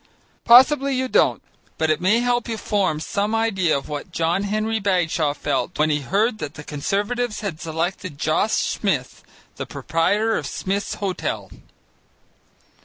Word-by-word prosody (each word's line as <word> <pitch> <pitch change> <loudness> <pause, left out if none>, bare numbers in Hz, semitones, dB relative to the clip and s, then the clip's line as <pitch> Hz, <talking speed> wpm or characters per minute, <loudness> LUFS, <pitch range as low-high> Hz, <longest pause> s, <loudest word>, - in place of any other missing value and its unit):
Possibly 265 +3 +6
you 260 0 0
don't, - - +2 0.3
but 160 -1 +2
it 155 - 0
may 210 +6 +3
help 245 -1 0
you 225 - -2
to - - -11
form 190 -7 0
some 205 +7 -1
idea 195 -9 +1
of 135 - -7
what 150 +4 -6
John 170 +4 0
Henry 215 +2 -1
Bagshaw 170 -7 +1
felt 145 +5 -2
when 155 +1 +2
he 150 - +1
heard 215 - 0
that 150 0 -6
the 150 - -9
Conservatives 205 +11 -2
had 190 -7 -5
selected 165 0 -3
Josh 160 +9 +1
Smith, 155 -12 -1 0.4
proprietor 205 +8 0
of 145 - -6
Smith's 195 +6 -3
Hotel. 195 -3 -3
195 Hz, 150 wpm, -22 LUFS, 155-220 Hz, 0.4 s, Possibly